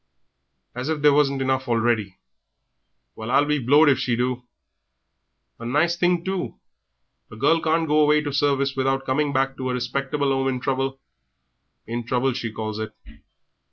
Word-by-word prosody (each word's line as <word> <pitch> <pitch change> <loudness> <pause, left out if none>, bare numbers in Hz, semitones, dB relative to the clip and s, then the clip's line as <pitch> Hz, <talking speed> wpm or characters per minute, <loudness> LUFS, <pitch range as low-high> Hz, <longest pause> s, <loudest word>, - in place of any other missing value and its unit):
As 125 +4 -4
if 155 -2 -2
there 145 -1 +6
wasn't 140 -2 +2
enough 130 0 -1
already! 115 -5 0 1.0
Well, 110 +1 -7
I 140 - +4
be 150 0 0
blowed 145 +5 +5
if 140 -3 +4
she 120 - 0
do! 125 0 -2 1.1
A 115 - -8
nice 155 +7 +2
thing, 175 -1 +1
too; 190 -1 -3 0.8
a - - -9
girl 155 +8 +2
can't 160 0 +1
go 150 +1 +3
away 150 0 +4
to 145 -2 -4
service 140 -1 +1
without 135 0 0
coming 140 +2 0
back 135 0 0
to 130 - -4
her 125 - -1
respectable 135 +3 -1
'ome 135 0 0
in 130 -1 -1
trouble 135 +1 -2 0.9
in 120 +1 -4
trouble, 125 +2 0
she 115 -2 -4
calls 110 0 -5
it. 110 0 -6
135 Hz, 165 wpm, -23 LUFS, 125-145 Hz, 1.1 s, there